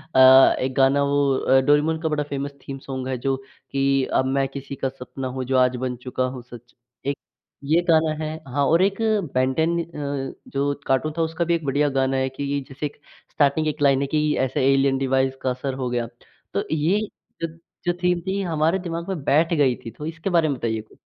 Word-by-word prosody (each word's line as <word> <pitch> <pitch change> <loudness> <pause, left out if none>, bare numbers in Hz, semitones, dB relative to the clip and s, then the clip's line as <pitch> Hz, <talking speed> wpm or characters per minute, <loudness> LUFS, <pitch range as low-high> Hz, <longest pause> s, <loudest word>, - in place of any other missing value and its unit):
अ, 130 0 +8
एक 130 0 -1
गाना 135 +1 +4
वो 140 -1 +2
अ, 135 0 +4
डोरेमोन 150 +3 +2
का 160 - 0
बड़ा 150 -1 0
फ़ेमस 140 0 -4 0.2
थीम 135 - -5
सॉन्ग 130 -1 -4
है 130 -1 -2
जो 135 +2 0 0.4
कि 135 0 +2
अब 130 - +3
मैं 135 0 +1
किसी 140 0 -7
का 135 - -2
सपना 130 0 -7
हूँ, 130 +1 -4
जो 130 +1 +1
आज 125 0 +3
बन 125 - -2
चुका 130 0 -1
हूँ 125 - -7
सच' 120 0 -14 0.3
एक 140 0 -1 0.5
ये 155 +5 +3
गाना 160 -1 +4
है, 155 +1 -3
हाँ, 140 +2 0
और 165 +5 +4
एक 195 0 +1 0.4
बेन 130 +1 +2
टेन 165 +3 +1
अ, 140 -4 -4
जो 140 +1 0
कार्टून 135 +4 +1
था - - +1
उसका 165 +1 -1
भी 170 0 +2
एक 165 -2 -4
बढ़िया 145 +2 +2
गाना 135 0 +1
है 130 0 0
कि 140 +2 -3
जैसे 140 +2 -5
एक 145 - -6 0.3
स्टार्टिंग 155 +1 +2
एक 155 0 -3
लाइन 140 -1 +4
है 140 - 0
कि 150 +1 +1
ऐसे 130 0 -1
एलियन 135 0 +2
डिवाइस 135 0 +1
का 130 - 0
असर 130 +1 -3
हो 130 -1 -3
गया। 120 -1 -1 0.5
तो - - 0
ये 160 +7 +2 0.4
जो 165 - 0 0.4
जो 175 - +2
थीम 180 -1 +2
थी 195 +2 -2
हमारे 165 0 +1
दिमाग़ 170 -2 -4
में 175 -8 -3
बैठ 160 +5 +3
गयी 140 -6 +3
थी, 115 - -5
तो 150 - -9
इसके 165 +3 -4
बारे 170 -3 +3
में 140 - -1
बताइए 110 -2 -2
कुछ? 110 - -21
140 Hz, 220 wpm, -23 LUFS, 130-155 Hz, 0.5 s, अ